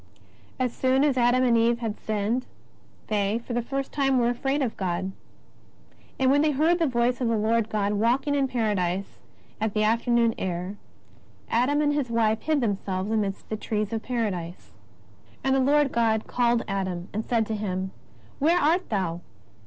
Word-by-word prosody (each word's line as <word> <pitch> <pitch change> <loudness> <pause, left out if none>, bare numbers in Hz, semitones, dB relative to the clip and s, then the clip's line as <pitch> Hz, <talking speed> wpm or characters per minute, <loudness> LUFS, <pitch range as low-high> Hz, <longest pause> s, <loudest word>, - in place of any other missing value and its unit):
As 250 -2 0
soon 260 +1 +2
as 290 -3 +3
Adam 245 +1 +3
and 240 -2 +4
Eve 230 +1 +3
had 225 -3 -4
sinned, 220 +4 -1 0.6
they, 205 0 0
for 245 - -5
the 240 - +1
first 270 +3 -4
time, 270 -2 +2
were 240 -1 +3
afraid 270 +4 0
of 235 - -2
God. 185 0 -2 1.1
'^And 260 0 +4
when 285 +1 +4
they 310 - +3
heard 315 +5 +2
the 330 - +2
voice 245 0 0
of 245 - +1
the 230 -1 +1
Lord 220 +1 +1
God 210 -1 0
walking 240 +7 +1
in 275 -1 +2
Paradise 200 -6 -1 0.4
at 220 -1 -1
the 215 - +2
afternoon 230 +1 +2
air, 180 +1 -3 0.8
Adam 265 +6 +2
and 290 0 +2
his 285 -4 -1
wife 220 -1 +1
hid 310 -3 +1
themselves 195 -2 -2
amidst 205 -3 -1
the 215 - -2
trees 210 0 -2
of 225 - -1
Paradise. 195 -9 -3 0.7
And 265 - +2
the 270 - +3
Lord 285 +1 +3
God 225 -2 +1
called 240 -1 +1
Adam, 185 -3 -3
and 215 +2 -2
said 230 -1 +1
to 220 - -3
him: 190 -2 -3 0.5
Where 325 +5 +3
art 345 +3 +2
thou 180 -5 -1
230 Hz, 175 wpm, -26 LUFS, 210-260 Hz, 1.1 s, and